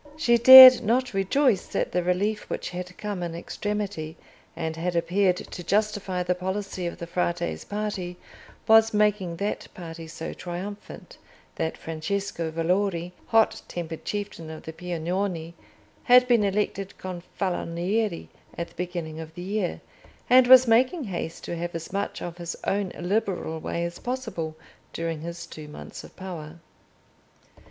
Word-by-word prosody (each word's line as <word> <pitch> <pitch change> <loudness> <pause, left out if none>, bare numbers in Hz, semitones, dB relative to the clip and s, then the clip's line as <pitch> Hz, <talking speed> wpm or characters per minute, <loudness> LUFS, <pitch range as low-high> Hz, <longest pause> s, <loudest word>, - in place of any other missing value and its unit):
She 240 -6 +3
dared 260 +1 +12
not 245 +3 +1
rejoice 195 +3 +2
that - - -2
the 180 - +1
relief 195 +5 -1
which - - -4
had 180 0 -7
come 205 -3 -4
in 170 -1 -4
extremity 195 -3 -4 0.4
and 160 -1 -3
had 175 +2 -2
appeared 180 +2 +2
to 175 - -8
justify 200 -1 0
the 180 0 +1
policy 190 0 -4
of 170 - -6
the 170 - -6
Frate's 175 0 -2
party 205 -4 -4 0.5
was 225 0 +6
making 210 -4 +1
that 200 +5 -3
party 165 -2 -8
so 160 0 -6
triumphant, 200 - -8 0.4
that 160 0 -2
Francesco 165 +2 -3
Valori, 175 +2 0 0.2
hot 225 -1 +3
tempered 165 -2 -6
chieftain 200 -6 -5
of 160 0 -9
the 160 - -7
Piagnoni, 175 0 -3 0.5
had 250 0 +7
been 235 -4 +4
elected 200 -1 -1
Gonfaloniere 180 +2 -3 0.3
at 170 - -4
the - - -22
beginning 170 -3 -5
of 160 0 -9
the 175 - -7
year, 195 -1 -2 0.5
and 255 0 +6
was 255 0 +9
making 255 +8 +3
haste 175 -6 -5
to - - -4
have 175 0 -4
as 165 +2 -6
much 200 +1 -3
of 175 0 -7
his 170 -1 -4
own 200 -1 -1
liberal 180 -3 -1
way 170 +2 -3
as 170 0 -6
possible 225 -11 -4 0.4
during 165 -2 -3
his 170 +1 -6
two 155 -1 -10
months 150 - -10
of - - -14
power. 170 -4 -8
180 Hz, 150 wpm, -26 LUFS, 170-210 Hz, 0.5 s, dared